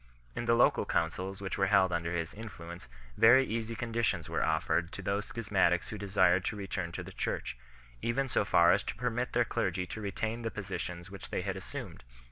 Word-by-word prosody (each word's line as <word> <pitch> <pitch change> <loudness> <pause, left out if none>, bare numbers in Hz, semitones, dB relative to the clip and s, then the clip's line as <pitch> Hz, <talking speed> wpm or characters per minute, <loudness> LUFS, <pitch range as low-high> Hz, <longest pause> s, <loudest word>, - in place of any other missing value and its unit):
In 120 - -3
the 115 0 +4
local 120 - +4
councils 90 +4 -1
which 95 0 -3
were 95 - +3
held 95 -2 +4
under 85 0 -1
his 85 -1 -2
influence 85 - -9 0.3
very 120 +4 +7
easy 115 0 -3
conditions 115 +1 -1
were - - 0
offered 85 +2 +1
to 100 - -6
those 100 +2 -1
schis 115 -3 -6
matics 90 -3 +3
who 110 - -5
desired 95 -2 +3
to - - -1
return 95 -4 -4
to - - -4
the - - -9
Church 60 - -3 0.5
4, - - -2
even 135 +3 +1
so 120 - +2
far 85 -3 +5
as - - +3
to - - -3
permit 125 +1 -2
their 120 0 +3
clergy 90 -3 -1
to 110 - -7
retain 110 +3 -3
the 115 - -2
positions 90 -3 -5
which 100 - -9
they - - -2
had - - -2
assumed. - - -7
100 Hz, 210 wpm, -31 LUFS, 90-115 Hz, 0.5 s, very